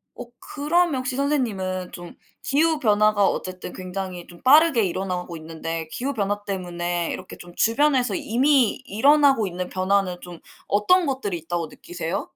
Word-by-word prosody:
어, -, -, -7 dB, 0.2 s
그러면 315 Hz, +2 st, 0 dB
혹시 255 Hz, 0 st, -3 dB
선생님은 200 Hz, -11 st, -1 dB
좀 175 Hz, -1 st, -9 dB, 0.3 s
기후 310 Hz, +2 st, +2 dB
변화가 210 Hz, -3 st, +3 dB
어쨌든 185 Hz, -1 st, -4 dB
굉장히 185 Hz, -1 st, -6 dB
좀 175 Hz, -1 st, -15 dB
빠르게 290 Hz, -3 st, +6 dB
일어나고 180 Hz, -2 st, -3 dB
있는데 160 Hz, 0 st, -5 dB
기후 275 Hz, +3 st, -3 dB
변화 205 Hz, -2 st, -2 dB
때문에 175 Hz, -3 st, -3 dB
이렇게 185 Hz, -, -8 dB
좀 175 Hz, 0 st, -12 dB
주변에서 250 Hz, -2 st, +2 dB
이미 255 Hz, +1 st, +2 dB
일어나고 275 Hz, +1 st, +4 dB
있는 180 Hz, 0 st, -5 dB
변화는 185 Hz, -1 st, 0 dB
좀 175 Hz, -2 st, -10 dB, 0.3 s
어떤 340 Hz, -, +3 dB
것들이 235 Hz, -10 st, -2 dB
있다고 170 Hz, 0 st, -3 dB
느끼세요? 175 Hz, +4 st, -5 dB
200 Hz, 350 characters per minute, -23 LUFS, 180-265 Hz, 0.3 s, 빠르게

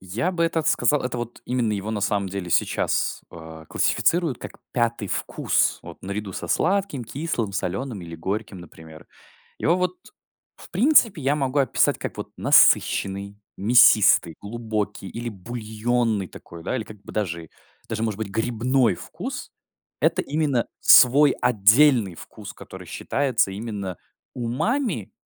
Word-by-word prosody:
Я 110 Hz, -, -2 dB
бы 170 Hz, -1 st, -1 dB
этот 165 Hz, -2 st, -1 dB
сказал, 135 Hz, +5 st, +2 dB
это 125 Hz, -1 st, -3 dB
вот 120 Hz, 0 st, -7 dB
именно 120 Hz, -4 st, -1 dB
его 105 Hz, +2 st, -3 dB
на 105 Hz, -, -3 dB
самом 100 Hz, -1 st, 0 dB
деле 95 Hz, -2 st, -5 dB
сейчас, -, -, 0 dB
э, 80 Hz, -1 st, -11 dB
классифицируют 170 Hz, -6 st, +1 dB
как -, -, -10 dB
5 120 Hz, -3 st, -1 dB
вкус, -, -, 0 dB
вот -, -, -12 dB
наряду 100 Hz, 0 st, -5 dB
со 85 Hz, -, -6 dB
сладким, 190 Hz, -, 0 dB
кислым, 120 Hz, -5 st, -3 dB
соленым 100 Hz, +3 st, -3 dB
или 85 Hz, -1 st, -8 dB
горьким, 100 Hz, +3 st, -4 dB
например. 80 Hz, -2 st, -13 dB, 0.5 s
Его 170 Hz, +3 st, +2 dB
вот, 180 Hz, -, -1 dB, 0.6 s
в -, -, -15 dB
принципе, 225 Hz, -, +4 dB
я 140 Hz, +2 st, +1 dB
могу 140 Hz, -1 st, -1 dB
описать 135 Hz, -, +2 dB
как -, -, -6 dB
вот -, -, -7 dB
насыщенный, 100 Hz, +1 st, +3 dB, 0.2 s
мясистый, 100 Hz, -5 st, +5 dB
глубокий 110 Hz, -2 st, -4 dB
или 120 Hz, +3 st, -5 dB
бульонный 110 Hz, 0 st, -2 dB
такой, 85 Hz, -1 st, -12 dB
да, -, -, -2 dB
или 110 Hz, -, -2 dB
как 105 Hz, -2 st, -13 dB
бы -, -, -11 dB
даже, 85 Hz, -6 st, -3 dB, 0.4 s
даже 110 Hz, 0 st, -3 dB
может 110 Hz, -3 st, -2 dB
быть 110 Hz, -2 st, -4 dB
грибной 120 Hz, +2 st, +1 dB
вкус. -, -, -7 dB, 0.5 s
Это -, -, +2 dB
именно 145 Hz, -5 st, 0 dB
свой 140 Hz, +3 st, +7 dB
отдельный 115 Hz, -, +4 dB
вкус, -, -, -10 dB
который -, -, -12 dB
считается 130 Hz, -8 st, 0 dB
именно 100 Hz, -3 st, -5 dB, 0.4 s
умами, 130 Hz, -, -2 dB
110 Hz, 140 wpm, -23 LUFS, 100-130 Hz, 0.6 s, свой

